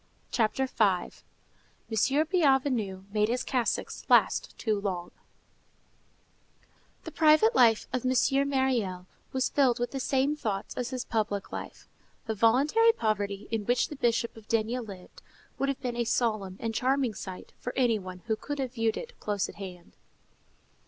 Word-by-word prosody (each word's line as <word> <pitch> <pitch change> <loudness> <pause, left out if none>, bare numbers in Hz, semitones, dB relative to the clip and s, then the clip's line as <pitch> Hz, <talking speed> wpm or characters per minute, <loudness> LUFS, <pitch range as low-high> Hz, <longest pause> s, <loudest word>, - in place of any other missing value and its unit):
CHAPTER 240 +3 +1
V—MONSEIGNEUR 225 - -1
BIENVENU 265 - +1
MADE 210 0 +2
HIS 250 +2 0
CASSOCKS 250 -4 -2
LAST - - +3
TOO 215 -3 -1
LONG 180 -3 -3 1.9
The 325 - -7
private 315 +10 +5
life 230 - +4
of 255 - -1
M. 255 - +1 0.4
Myriel 240 -10 0 0.3
was 260 -1 0
filled 260 -4 +3
with 245 - -2
the 270 - -3
same 270 +3 +1
thoughts 210 -9 -3
as 250 -2 -3
his 255 -2 -4
public 210 -3 -2
life. - - -7 0.4
The 225 - -1
voluntary 280 - +4
poverty 205 - -2
in 225 -2 -1
which 245 +1 +2
the 300 - -6
Bishop 235 -3 0
of 220 -1 -14
D—— 230 +2 0
lived, 200 -6 -10 0.4
would 275 - +1
have 275 - -3
been 250 -2 -3
a 240 - +1
solemn 215 -5 -1
and 225 -1 -3
charming 260 -1 +1
sight 190 -2 -8
for 250 - -4
any 240 -4 +2
one 185 -1 -9
who 220 -2 0
could 290 +6 -5
have 260 -3 -3
viewed 225 -2 0
it - - -8
close 205 -2 -1
at - - -11
hand. 180 -3 -9
235 Hz, 155 wpm, -28 LUFS, 210-265 Hz, 1.9 s, private